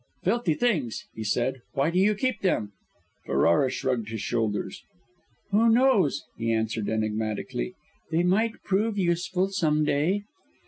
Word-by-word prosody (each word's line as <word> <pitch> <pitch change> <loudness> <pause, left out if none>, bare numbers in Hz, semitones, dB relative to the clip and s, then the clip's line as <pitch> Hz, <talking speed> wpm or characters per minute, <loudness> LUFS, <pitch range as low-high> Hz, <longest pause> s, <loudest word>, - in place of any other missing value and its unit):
"Filthy 195 -4 +1
things!" 160 - 0
he 110 - -6
said. 125 +4 0
"Why 140 +4 +1
do 180 - +1
you 210 +2 +4
keep 230 0 -1
them?" 110 - 0 0.6
Ferrara 85 - +3
shrugged 125 -4 -2
his 110 0 -4
shoulders. 105 -1 -2 0.7
"Who 225 +3 +4
knows?" 225 - +3 0.2
he 115 0 0
answered 110 -1 -1
enigmatically. 110 - -2 0.3
"They 165 +1 +1
might 220 +5 +1
prove 205 +2 0
useful, 180 +1 0
some 155 -6 +1
day." 165 +8 +1
160 Hz, 135 wpm, -26 LUFS, -, 0.7 s, you